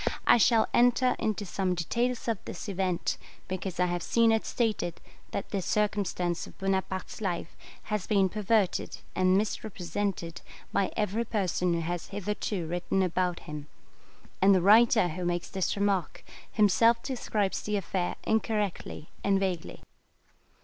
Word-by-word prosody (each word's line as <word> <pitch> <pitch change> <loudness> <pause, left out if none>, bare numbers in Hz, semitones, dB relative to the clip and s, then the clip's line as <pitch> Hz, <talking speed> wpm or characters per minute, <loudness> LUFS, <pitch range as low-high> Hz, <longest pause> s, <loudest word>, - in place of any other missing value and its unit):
I - - +7
shall 230 0 +4
enter 245 +1 +4
into 215 -1 -1
some 185 0 -1
details 240 +9 -1
of 225 -4 0
this 175 - -6
event, 185 -3 -1 0.3
because 185 -1 -4
I 180 - +4
have 175 0 -1
seen 230 +3 +3
it 220 0 +1
stated 215 -8 -1 0.3
that 200 - -5
this 195 -4 -2
circumstance 200 -4 0
of - - -15
Bonaparte's 190 0 -2
life 175 -4 -3 0.3
has 210 -3 -3
been 200 -3 +4
perverted 210 0 0 0.2
and 185 0 +4
misrepresented 195 -4 -3 0.3
by 195 - +1
every 215 +2 0
person 180 -5 0
who 165 - -1
has 175 +1 -3
hitherto 205 -2 -3
written 175 +3 0
about 180 0 0
him; 150 -1 -7 0.7
and 195 +1 +6
the 185 - +3
writer 220 -1 +6
who 180 +3 -5
makes 175 0 -1
this 190 -2 -1
remark, 200 -4 0 0.3
himself 230 +3 +4
describes 215 -6 -1
the 210 0 -1
affair 185 -1 -2
incorrectly 210 -7 -1
and 195 -1 +3
vaguely. 185 -4 -3
195 Hz, 140 wpm, -29 LUFS, 180-215 Hz, 0.7 s, I